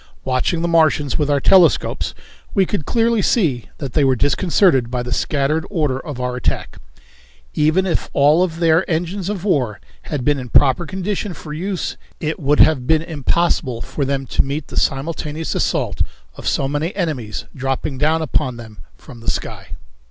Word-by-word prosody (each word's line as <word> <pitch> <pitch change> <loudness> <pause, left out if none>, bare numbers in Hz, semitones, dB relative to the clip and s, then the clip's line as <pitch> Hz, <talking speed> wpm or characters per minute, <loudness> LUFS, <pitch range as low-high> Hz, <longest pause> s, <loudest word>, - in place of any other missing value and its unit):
Watching 130 +6 0
the - - +1
Martians 155 -4 +2
with 150 -1 +1
our 145 -1 +3
telescopes 180 +4 +3 0.4
we 195 -2 +4
could 180 -6 -3
clearly 230 -1 +2
see 155 - +1
that 135 -5 -6
they 150 - +3
were 135 -1 +3
disconcerted 145 - +2
by 125 0 -2
the 125 0 -3
scattered 150 +4 0
order 150 -9 0
of 145 -4 -7
our 125 0 -2
attack. 125 - -3 0.7
Even 155 +5 +2
if 180 - -1
all 150 +4 +4
of 170 -3 0
their 165 +1 +4
engines 175 +3 -2
of 200 -4 -3
war 130 - 0 0.3
had 135 -4 -3
been 145 -1 +2
in 125 -1 -7
proper 145 +7 +3
condition 190 0 -3
for 150 -1 -8
use 185 +4 -3 0.2
it 155 0 -3
would 145 0 +3
have 130 -6 +4
been 160 +1 +3
impossible 155 -4 0
for 140 - -3
them 135 0 -1
to - - +1
meet 140 +2 -3
the - - -9
simultaneous 155 +2 -1
assault 120 - -1 0.3
of - - -7
so 135 - +1
many 145 +5 -2
enemies 145 - -3
dropping 135 0 -2
down 160 +2 +2
upon 140 -5 -1
them 110 -2 -11 0.2
from 120 - -13
the 115 - -4
sky. - - -5
150 Hz, 175 wpm, -19 LUFS, 135-170 Hz, 0.7 s, we